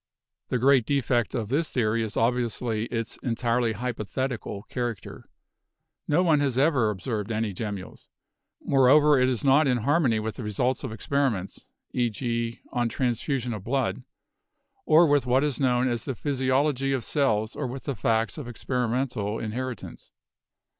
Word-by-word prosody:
The - - +1
great 130 -1 +4
defect 125 -4 +1
of 110 -4 -2
this 155 +5 0
theory 115 -2 +1
is 110 -1 -4
obviously 115 -1 0
its 115 -2 -4
entirely 120 -1 0
hypothetical 120 -1 -4
character 120 -5 -5 0.4
— - - -58 0.3
no 165 +5 +3
one 160 -4 +4
has 135 -4 0
ever 135 -6 +3
observed 105 +2 -3
any 110 -2 -1
gemmules. 100 -1 -6 0.6
Moreover, 140 +2 +5
it 130 - +3
is 125 -3 -1
not 140 +3 +5
in 125 -2 +2
harmony 130 -2 +2
with 110 0 -4
the 125 - -5
re 105 - -3
sults 125 +6 0
of 130 - -4
experiments 115 -5 -2
— - - -51
e.g., 115 -1 -1
on 120 -1 0
transfusion 125 0 -1
of 105 -3 -6
blood 130 +2 -1 0.4
— - - -46
or 160 +2 +7
with 145 -4 +2
what 130 +3 +3
is 150 -3 -1
known 125 -2 +2
of 120 -2 -1
the 135 - -4
physiology 135 +1 0
of 130 -3 -1
cells 110 -7 0
or 145 - -3
with 125 0 -7
the 140 - -3
facts 115 +5 0
of 140 - -7
experimental 120 -3 -2
inheritance. 120 +1 -5
125 Hz, 160 wpm, -26 LUFS, 115-135 Hz, 0.6 s, or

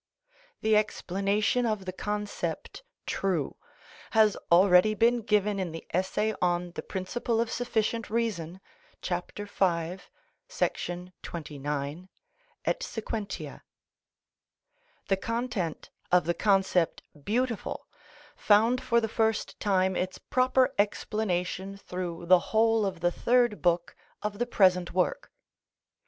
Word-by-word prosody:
The 220 0 +3
explanation 210 +3 +1
of 215 -3 -2
the 185 - -3
concept 210 - -4 0.2
true 180 -8 -1 0.6
has 215 -2 +6 0.2
already 180 +4 +6
been 235 +2 +3
given 210 -2 +1
in 180 -3 -2
the 165 - -8
essay 200 +4 0
on 175 0 +1
the - - -5
principle 225 +4 -2
of 230 -1 0
sufficient 230 -2 -1
reason, 190 -6 -2 0.4
chap. 180 0 -2
v. 205 - -3
§ 180 - -3
29 150 +1 -5 0.6
et - - 0
seq. 225 - -6
The 215 -3 -4 1.6
content 230 -8 -3 0.2
of 180 -2 +4
the 170 - +1
concept 190 -3 +2 0.2
beautiful 235 - -1 0.5
found 225 +4 +4
for 235 -1 +3
the 225 - -1
first 220 0 0
time 190 -2 +2
its 185 0 -2
proper 255 0 +2
explanation 195 -2 -1
through 180 -3 -5
the 180 +1 +7
whole 225 +1 +2
of 185 -3 -5
the 175 0 +2
Third 240 +1 +2
Book 175 -1 +1 0.3
of 210 0 -3
the 240 - 0
present 185 -6 +3
work. 180 - 0
200 Hz, 115 wpm, -28 LUFS, 180-220 Hz, 1.6 s, the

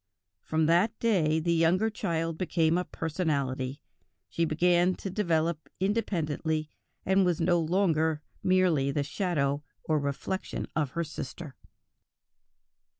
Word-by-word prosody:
From 160 0 0
that 180 +8 +3
day 165 -9 +2
the 170 +1 +1
younger 175 +7 +3
child 165 -6 -2
became 165 -2 +1
a 180 - +1
personality; 140 -5 -2 0.5
she 165 - 0
began 175 +3 +3
to 195 - -6
develop 170 -5 0
independently, 160 -7 -1 0.3
and 190 +1 +4
was 175 -3 +1
no 175 +1 +3
longer 160 -3 +1 0.2
merely 180 -7 +3
the 140 +1 0
shadow 145 -4 -1 0.2
or 155 -1 +1
reflection 140 +7 -3
of 145 -4 -1
her 170 - -1
sister." 150 -1 -7
165 Hz, 120 wpm, -29 LUFS, 155-180 Hz, 0.5 s, and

